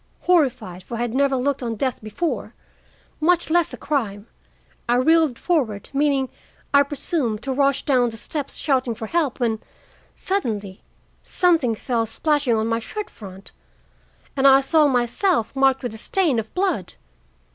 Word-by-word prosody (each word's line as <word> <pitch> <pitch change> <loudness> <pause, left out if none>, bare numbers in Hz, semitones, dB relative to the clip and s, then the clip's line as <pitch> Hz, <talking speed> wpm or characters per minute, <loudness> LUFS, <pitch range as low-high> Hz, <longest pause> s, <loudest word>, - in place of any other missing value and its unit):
Horrified, 255 - +1
for 235 - -7
I - - -3
had 240 -1 -2
never 275 0 +2
looked 270 +2 -1
on 230 -2 -3
death 260 +3 -2
before, 220 +10 -4 0.6
much 340 +1 +2
less 345 -1 +2
crime, 220 -9 -2 0.6
I 240 - +4
reeled 310 0 +3
forward, 245 - -1
meaning, 275 -2 +1 0.4
I 280 - +7
presume, 280 -4 -1
to 265 +5 -4
rush 275 0 +1
down 250 -4 +3
the 225 - -9
steps 280 +4 -4
shouting 260 -5 0
for 220 - -6
help, 305 0 -1
when, 225 -3 0 0.6
suddenly, 210 - -3 0.4
something 325 -11 +2
fell 230 0 -1
splashing 290 0 +1
on 220 0 0
my 230 0 0
shirt 420 - -6
front, 195 -2 -11 0.8
and 275 0 +4
I 270 0 +7
saw 305 +2 +3
myself 250 - +1
marked 270 0 +2
with 245 -3 -3
a 220 - -9
stain 320 - +1
of 220 0 -6
blood. 380 +1 -1
265 Hz, 155 wpm, -22 LUFS, 230-300 Hz, 0.8 s, I